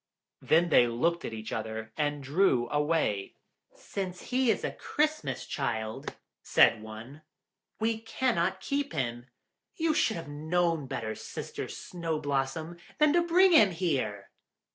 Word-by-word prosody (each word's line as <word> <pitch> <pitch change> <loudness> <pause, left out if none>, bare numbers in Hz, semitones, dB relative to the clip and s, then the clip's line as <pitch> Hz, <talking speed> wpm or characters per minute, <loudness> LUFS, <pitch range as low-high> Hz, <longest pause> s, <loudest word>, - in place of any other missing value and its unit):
Then 170 +2 +3
they 120 -6 +6
looked 165 +9 0
at - - -4
each 110 0 -6
other, 110 0 -5
and 145 -2 -1
drew 135 -4 +2
away. 150 -10 0 0.4
"Since 185 -3 -6
he 255 -1 +2
is - - +1
a - - -1
Christmas 305 +1 -1
Child," 110 -5 -3 0.3
said 110 - +4
one, 110 +7 -10 0.6
"we 225 0 0
cannot 225 -5 0
keep 280 0 -2
him. 120 -3 -3 0.5
You 320 -1 +1
should 225 - +2
have 165 - -7
known 160 +1 0
better, 110 -3 -3
Sister - - -6
Snow 165 -3 -4
blossom, 145 +4 -2 0.2
than 300 -1 +4
to 345 - +4
bring 360 +3 +5
him 220 - +7
here!" 140 - -2
160 Hz, 140 wpm, -29 LUFS, 120-200 Hz, 0.6 s, him